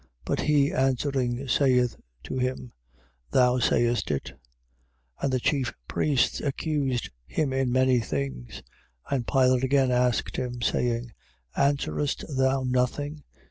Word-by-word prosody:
But -, -, -1 dB
he 145 Hz, -2 st, +3 dB
answering, 130 Hz, -1 st, 0 dB
saith 125 Hz, -2 st, +3 dB, 0.3 s
to 130 Hz, -, -4 dB
him: 125 Hz, -1 st, -2 dB, 0.6 s
Thou 125 Hz, -, +3 dB
sayest 120 Hz, -1 st, +1 dB
it. 70 Hz, -2 st, -1 dB
15:3. -, -, -10 dB, 0.9 s
And 140 Hz, -, 0 dB
the 130 Hz, -, +1 dB
chief 130 Hz, 0 st, 0 dB
priests 140 Hz, -4 st, +1 dB
accused 140 Hz, -3 st, -1 dB, 0.2 s
him 145 Hz, -4 st, -1 dB
in 135 Hz, -2 st, 0 dB
many 130 Hz, 0 st, +3 dB
things. 70 Hz, -, -4 dB, 0.5 s
15:4. -, -, +2 dB
And 120 Hz, -3 st, -2 dB
Pilate 130 Hz, -2 st, +3 dB
again 135 Hz, -1 st, +3 dB
asked 125 Hz, -1 st, +1 dB
him, 125 Hz, -1 st, -3 dB
saying: 120 Hz, 0 st, 0 dB, 0.4 s
Answerest 140 Hz, +1 st, 0 dB
thou 130 Hz, 0 st, +2 dB
nothing? 130 Hz, +4 st, -1 dB
130 Hz, 130 wpm, -26 LUFS, 125-135 Hz, 0.9 s, he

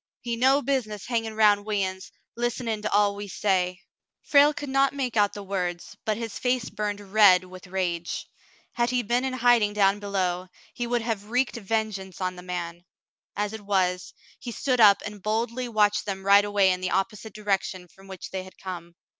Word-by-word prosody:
"He 235 Hz, -1 st, -2 dB
no 265 Hz, +4 st, +3 dB
busi 265 Hz, -3 st, 0 dB
ness 210 Hz, -2 st, -8 dB
hangin' 225 Hz, -2 st, -2 dB
roun' 210 Hz, -2 st, +4 dB
we 205 Hz, -2 st, 0 dB
uns, 190 Hz, 0 st, -7 dB, 0.2 s
list'nin' 235 Hz, -2 st, -2 dB
to 210 Hz, -, -3 dB
all 205 Hz, 0 st, +3 dB
we 205 Hz, 0 st, -6 dB
say." 185 Hz, -2 st, 0 dB, 0.4 s
Frale 290 Hz, 0 st, +5 dB
could 290 Hz, -1 st, -6 dB
not 275 Hz, +1 st, +3 dB
make 255 Hz, -4 st, -2 dB
out 205 Hz, -2 st, +3 dB
the 205 Hz, -1 st, -7 dB
words, 180 Hz, -3 st, -4 dB
but 215 Hz, -1 st, 0 dB
his 225 Hz, -3 st, -5 dB
face 250 Hz, -2 st, 0 dB
burned 210 Hz, -1 st, -3 dB
red 200 Hz, -2 st, +5 dB
with 185 Hz, 0 st, -12 dB
rage. 175 Hz, -2 st, -2 dB, 0.5 s
Had 240 Hz, 0 st, +1 dB
he 250 Hz, 0 st, 0 dB
been 240 Hz, +3 st, +1 dB
in 265 Hz, -1 st, -2 dB
hiding 240 Hz, -4 st, +3 dB
down 200 Hz, -1 st, +3 dB
below, 185 Hz, -3 st, -2 dB, 0.3 s
he 240 Hz, -, -3 dB
would 240 Hz, -1 st, 0 dB
have 220 Hz, -3 st, -3 dB
wreaked 250 Hz, +1 st, 0 dB
vengeance 210 Hz, -3 st, -3 dB
on 185 Hz, -1 st, -2 dB
the 180 Hz, -, -9 dB
man; 175 Hz, -1 st, -5 dB, 0.5 s
as 205 Hz, +1 st, -2 dB
it 220 Hz, -, -7 dB
was, 185 Hz, -3 st, 0 dB, 0.3 s
he 245 Hz, -, -6 dB
stood 255 Hz, +1 st, -1 dB
up 205 Hz, -3 st, +7 dB
and 210 Hz, -1 st, -7 dB
boldly 235 Hz, +4 st, -2 dB
watched 210 Hz, -2 st, +2 dB
them 195 Hz, -1 st, -4 dB
ride 200 Hz, +1 st, +6 dB
away 200 Hz, -2 st, +3 dB
in 185 Hz, 0 st, -2 dB
the 185 Hz, -, -1 dB
oppo 195 Hz, +3 st, 0 dB
site 215 Hz, 0 st, -11 dB
direction 195 Hz, -3 st, -2 dB
from 195 Hz, +3 st, -18 dB
which 190 Hz, -1 st, -8 dB
they 190 Hz, -, -3 dB
had 185 Hz, -, -14 dB
come. 175 Hz, -2 st, -8 dB
205 Hz, 200 wpm, -26 LUFS, 190-230 Hz, 0.5 s, up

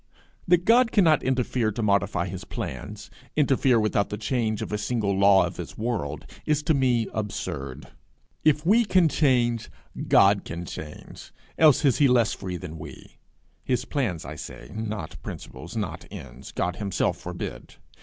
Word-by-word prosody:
That 175 Hz, 0 st, +4 dB
God 235 Hz, +1 st, +5 dB
cannot 165 Hz, -8 st, +4 dB
interfere 125 Hz, -3 st, 0 dB
to 115 Hz, +2 st, -3 dB
modify 100 Hz, -3 st, +1 dB
his 95 Hz, 0 st, -6 dB
plans, -, -, -7 dB, 0.2 s
interfere 135 Hz, -4 st, +3 dB
without 105 Hz, -1 st, +1 dB
the 105 Hz, -, -4 dB
change 110 Hz, -1 st, -1 dB
of -, -, -7 dB
a 105 Hz, -, 0 dB
single 105 Hz, -3 st, 0 dB
law 100 Hz, 0 st, +5 dB
of -, -, -6 dB
his -, -, -7 dB
world, 100 Hz, -11 st, -3 dB, 0.2 s
is 150 Hz, -1 st, 0 dB
to 155 Hz, -, +2 dB
me 125 Hz, -5 st, +2 dB
absurd. 70 Hz, -10 st, -4 dB, 0.6 s
If 150 Hz, 0 st, +3 dB
we 220 Hz, +6 st, +5 dB
can 185 Hz, -5 st, +4 dB
change, 120 Hz, -6 st, +1 dB, 0.4 s
God 100 Hz, 0 st, +5 dB
can 85 Hz, +1 st, -6 dB
change, 75 Hz, -2 st, -9 dB, 0.2 s
else 155 Hz, -1 st, +5 dB
is 135 Hz, -, +3 dB
he 145 Hz, -, +6 dB
less 120 Hz, -3 st, +3 dB
free 95 Hz, -2 st, -5 dB
than 80 Hz, -3 st, -8 dB
we -, -, -11 dB, 0.4 s
his 125 Hz, -1 st, -1 dB
plans, 110 Hz, -, -2 dB
I 75 Hz, -, -7 dB
say, -, -, -9 dB
not 110 Hz, -1 st, -5 dB
principles, 85 Hz, -, -8 dB
not 105 Hz, -4 st, -4 dB
ends: -, -, -10 dB
God 90 Hz, +1 st, -2 dB
himself 100 Hz, -3 st, -1 dB
forbid! -, -, -7 dB
110 Hz, 160 wpm, -25 LUFS, 95-135 Hz, 0.6 s, he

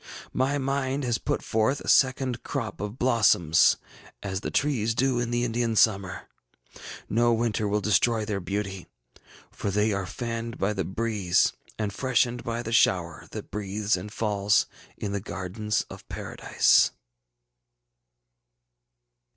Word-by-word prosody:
My 135 Hz, +3 st, +1 dB
mind 135 Hz, 0 st, -1 dB
has 120 Hz, -2 st, 0 dB
put -, -, -2 dB
forth 110 Hz, +6 st, +1 dB
a -, -, -10 dB
second 130 Hz, -2 st, +3 dB
crop 115 Hz, -9 st, -4 dB
of 105 Hz, +3 st, -5 dB
blossoms, 100 Hz, -, +4 dB, 0.5 s
as 95 Hz, -2 st, -3 dB
the -, -, -3 dB
trees 115 Hz, -6 st, 0 dB
do 130 Hz, 0 st, +1 dB
in 120 Hz, -1 st, -1 dB
the 120 Hz, 0 st, 0 dB
Indian 115 Hz, -1 st, 0 dB
summer. 100 Hz, -3 st, +2 dB, 0.8 s
No 120 Hz, +2 st, +2 dB
winter 110 Hz, -2 st, 0 dB
will 105 Hz, +1 st, 0 dB
destroy 110 Hz, +2 st, +2 dB
their 105 Hz, -2 st, -2 dB
beauty, 95 Hz, 0 st, -4 dB, 0.6 s
for -, -, -4 dB
they 105 Hz, +2 st, +1 dB
are 100 Hz, -2 st, -2 dB
fanned 115 Hz, +1 st, -4 dB
by 100 Hz, +2 st, 0 dB
the 95 Hz, -2 st, -2 dB
breeze 100 Hz, -1 st, +1 dB, 0.2 s
and 105 Hz, -2 st, -2 dB
freshened 125 Hz, 0 st, +1 dB
by 115 Hz, 0 st, -3 dB
the 115 Hz, -, -5 dB
shower 90 Hz, -6 st, +2 dB
that -, -, -8 dB
breathes 105 Hz, +1 st, -1 dB
and 95 Hz, +3 st, -7 dB
falls 105 Hz, -2 st, +2 dB, 0.3 s
in 100 Hz, -, -4 dB
the 100 Hz, -1 st, -2 dB
gardens 105 Hz, +2 st, -3 dB
of -, -, -12 dB
Paradise! -, -, +2 dB
110 Hz, 140 wpm, -26 LUFS, 100-120 Hz, 0.8 s, blossoms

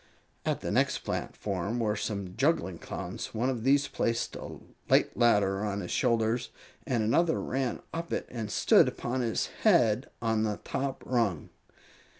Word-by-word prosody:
At -, -, 0 dB
the -, -, -3 dB
next -, -, +1 dB
platform 100 Hz, +4 st, -3 dB
were 105 Hz, -2 st, +1 dB
some 100 Hz, -3 st, -3 dB
juggling 120 Hz, -, +1 dB
Clowns. -, -, -6 dB
One 125 Hz, +4 st, +1 dB
of 120 Hz, -4 st, -4 dB
these 140 Hz, +2 st, +4 dB
placed 115 Hz, 0 st, -1 dB
a -, -, -7 dB, 0.3 s
light -, -, +4 dB
ladder 105 Hz, -4 st, +3 dB
on 100 Hz, -1 st, -2 dB
his 90 Hz, -, -6 dB
shoulders, 115 Hz, +1 st, +1 dB, 0.4 s
and 120 Hz, -5 st, +1 dB
another 160 Hz, +10 st, +2 dB
ran 130 Hz, -1 st, -2 dB
up 165 Hz, 0 st, -4 dB
it -, -, -1 dB
and 115 Hz, -4 st, -4 dB
stood -, -, +5 dB
upon 125 Hz, +2 st, -2 dB
his 115 Hz, -2 st, 0 dB, 0.2 s
head 130 Hz, -, +4 dB
on 110 Hz, -1 st, +1 dB
the 105 Hz, -1 st, 0 dB
top 135 Hz, 0 st, -3 dB
rung. 115 Hz, -, 0 dB
115 Hz, 155 wpm, -29 LUFS, 105-130 Hz, 0.4 s, stood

